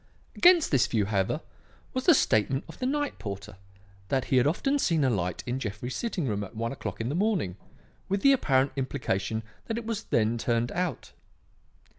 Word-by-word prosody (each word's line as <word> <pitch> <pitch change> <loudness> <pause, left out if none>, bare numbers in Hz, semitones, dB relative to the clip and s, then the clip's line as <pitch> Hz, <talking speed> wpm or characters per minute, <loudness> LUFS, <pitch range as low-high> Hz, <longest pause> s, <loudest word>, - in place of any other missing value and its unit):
"Against 350 -2 +6
this 135 -3 +4
view, 110 -4 +1
however, 100 - 0 0.5
was 255 0 -2
the 340 - +8
statement 130 - +2
of - - -12
the 255 - -1
night 290 0 -1
porter 100 -1 -6 0.5
that 135 -2 +1
he 130 - +2
had 125 - +4
often 275 - +1
seen 165 - +2
a 130 - +3
light 90 -5 -2
in 125 +1 -2
Jeffrey's 120 +2 -4
sitting 220 -9 -2
room 105 -3 -1
at 100 - -10
one 115 +1 -2
o'clock 135 - -6
in 115 - -2
the - - -2
morning, 185 - 0 0.5
with 195 +1 0
the 275 - +7
apparent 135 - +2
implication 110 -6 -2 0.2
that 225 - -2
it 235 - -5
was 225 -1 -3
then 115 +1 +1
turned 120 +1 0
out. 175 -7 -3
130 Hz, 190 wpm, -28 LUFS, -, 0.5 s, the